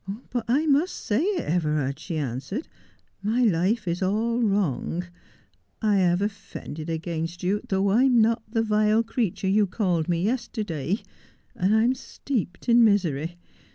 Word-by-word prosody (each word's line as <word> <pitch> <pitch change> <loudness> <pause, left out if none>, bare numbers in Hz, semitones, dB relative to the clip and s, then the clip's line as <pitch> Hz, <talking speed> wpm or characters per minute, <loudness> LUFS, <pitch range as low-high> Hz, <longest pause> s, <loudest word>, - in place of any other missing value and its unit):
" 250 - -24
But 245 -2 -2
I 275 +7 +2
must 305 +4 +2
say 215 +5 -1
it, 385 +2 0
Everard," 150 -4 0
she 165 0 -4
answered. 145 - -4 0.3
" - - -41
My 245 +2 +2
life 200 +1 +1
is 170 +2 -1
all 225 +5 +1
wrong. 180 - 0 0.7
I 210 -2 +2
have 180 0 +2
offended 170 -6 -6
against 165 +1 -4
you, 200 +3 +1
though 195 0 +2
I 235 +7 +4
am 250 -3 +4
not 225 +1 +3
the 225 0 +1
vile 215 +1 +3
creature 225 -5 -2
you 205 +1 +3
called 180 -4 0
me 170 0 +1
yesterday; 210 - -2 0.5
and 190 +4 +2
I 220 - +4
am 245 +2 +3
steeped 245 -7 -4
in 235 0 +6
misery. 175 -6 +1
205 Hz, 160 wpm, -25 LUFS, 170-230 Hz, 0.7 s, in